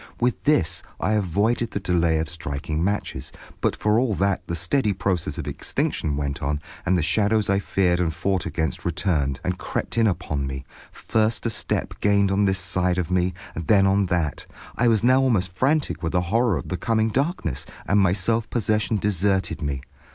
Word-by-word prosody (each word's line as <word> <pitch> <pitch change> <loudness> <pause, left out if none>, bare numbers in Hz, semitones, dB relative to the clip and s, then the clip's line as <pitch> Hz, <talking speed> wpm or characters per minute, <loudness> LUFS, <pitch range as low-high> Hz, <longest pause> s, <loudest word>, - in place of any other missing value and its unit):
With 125 0 0
this 145 - +2 0.2
I - - 0
avoided 105 +4 +1
the 100 - -3
delay 85 -4 +2
of 80 0 -1
striking 80 -1 -3
matches, 100 +2 -2 0.3
but - - +1
for 105 +1 +2
all 120 -5 +1
that 95 +1 +1
the 85 - -2
steady 105 - +1
process 95 -2 -1
of - - -4
extinction 75 -3 -2
went 70 -1 -3
on, 75 +2 -1 0.3
and 95 +1 +3
the 85 - +1
shadows 105 +4 +2
I 100 - +3
feared 90 -3 +1
and 85 -2 +1
fought 90 +3 -1
against 80 -1 -2
returned, 75 -6 0
and 90 0 -2
crept 115 - -3
in 115 - +4
upon 80 -7 -2
me, 65 -1 -6 0.3
first 110 +1 0
a 115 - +1
step - - -2
gained 100 -1 +3
on 100 +1 +2
this 95 -1 +2
side 90 0 0
of 90 -1 -2
me, 90 -1 +1 0.2
then 95 +4 +3
on 95 0 +3
that. 85 -6 -1 0.3
I 120 - +2
was 110 -3 +3
now 130 +2 +5
almost 105 -9 +1
frantic 130 - +1
with 80 -1 -2
the 90 - +3
horror 115 -5 +3
of 65 - -6
the 90 - -2
coming 110 +3 +1
darkness, 135 - -1 0.2
and 100 - +3
my 95 -2 +4
self 110 +4 0
possession 110 -1 +1
deserted 95 -3 0
me. 70 -3 -2
95 Hz, 190 wpm, -24 LUFS, 85-110 Hz, 0.3 s, now